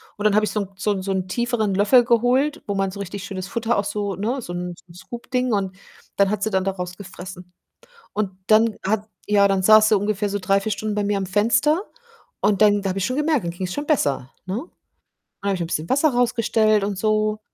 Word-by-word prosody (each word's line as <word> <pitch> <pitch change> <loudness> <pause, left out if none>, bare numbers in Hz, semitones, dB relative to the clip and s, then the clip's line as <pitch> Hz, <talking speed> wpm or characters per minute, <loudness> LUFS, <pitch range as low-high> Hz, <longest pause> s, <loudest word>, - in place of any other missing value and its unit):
und 205 - -6
dann 210 -1 +3
habe 215 0 +4
ich 195 - -3
so 210 - -1
'n 195 - -6
so 210 - 0
'n 195 -2 -2
so 195 - -2
'n 190 -1 -1
tieferen 220 -2 -1
Löffel 240 +5 +5
geholt, 255 +6 +2
wo 200 - -2
man 195 0 0
so 200 - -9
richtig 195 0 -6
schönes 190 -1 -5
Futter 230 +2 -1
auch 200 - +1
so 205 -1 -3
ne, 235 +7 -2
so 175 - -7
'n 175 0 -4
so - - -20
'n - - -16
Scoop 235 +6 -10
Ding 250 -1 +1
und 190 -2 -1 0.4
dann 200 -1 +3
hat 210 -1 -2
sie 220 - +1
dann 190 -2 0
daraus 180 -2 -4
gefressen. 185 -2 -10 0.6
Und 205 -2 -1 0.2
dann 220 0 +4
hat 215 +2 -1 0.2
ja, 200 -1 +5
dann 195 -1 +1
saß 215 +2 +6
sie 215 - +5
ungefähr 205 0 -1
so 205 - -1
3, 195 +2 +2
4 215 +1 -2
Stunden 210 +1 -3
bei 205 - 0
mir 205 0 0
am 190 - -3
Fenster 230 - +2 0.6
und 205 -1 +2
dann 205 -1 +4
da 195 - -1
habe 190 +1 -2
ich 190 - -1
schon 255 +5 -1
gemerkt, 300 - +1
dann 170 - -2
ging's 180 +1 -4
schon 290 0 -4
besser, 140 - 0
ne? 185 - -3 0.9
Dann 200 - -1
habe 195 - +1
ich 180 - -5
'n 165 - -2
bisschen 160 -1 -3
Wasser 285 +4 +3
rausgestellt 225 -3 +2
und 200 -2 -3
so, 215 0 +1
205 Hz, 245 wpm, -22 LUFS, 190-220 Hz, 0.9 s, saß